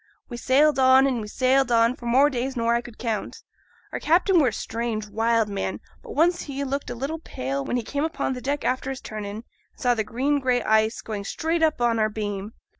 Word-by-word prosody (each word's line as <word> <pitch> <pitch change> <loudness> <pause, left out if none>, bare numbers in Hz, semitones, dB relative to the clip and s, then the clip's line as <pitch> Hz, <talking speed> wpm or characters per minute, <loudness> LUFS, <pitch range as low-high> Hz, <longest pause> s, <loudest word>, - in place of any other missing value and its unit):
We 240 - -6
sailed 275 +4 +3
on, 260 +1 +6
and 255 -4 0
we 210 - -6
sailed 255 +3 +2
on, 230 +1 +4
for 240 - -8
more 270 +5 +4
days 260 +1 -3
nor 230 0 +2
I 235 - +1
could 240 -2 -13
count. 225 -3 -4 0.5
Our - - -4
captain 355 +3 +3
were 285 - +4
a - - +1
strange, 225 0 -3
wild 225 +1 +1
man, 200 -1 -3 0.2
but 460 - -9
once 345 +3 +3
he 280 -1 -4
looked 275 +1 -3
a 245 - -4
little 280 +7 -4
pale 135 - -4
when 245 - -1
he 240 - -2
came 285 +6 -2
upo' 320 -3 -2
deck 285 +2 -2
after 255 +1 -1
his 265 -1 -4
turn 215 -1 -7
in, 200 0 -6
and 220 - -8 0.3
saw 245 -1 +1
the 220 -2 -1
green 270 +7 0
gray 250 -2 +1
ice 220 +1 +2
going 210 -2 -5
straight 325 +10 -2
up 315 -4 +2
on 235 -1 +2
our 215 0 +2
beam. 205 -1 -4
245 Hz, 230 wpm, -24 LUFS, 220-275 Hz, 0.5 s, on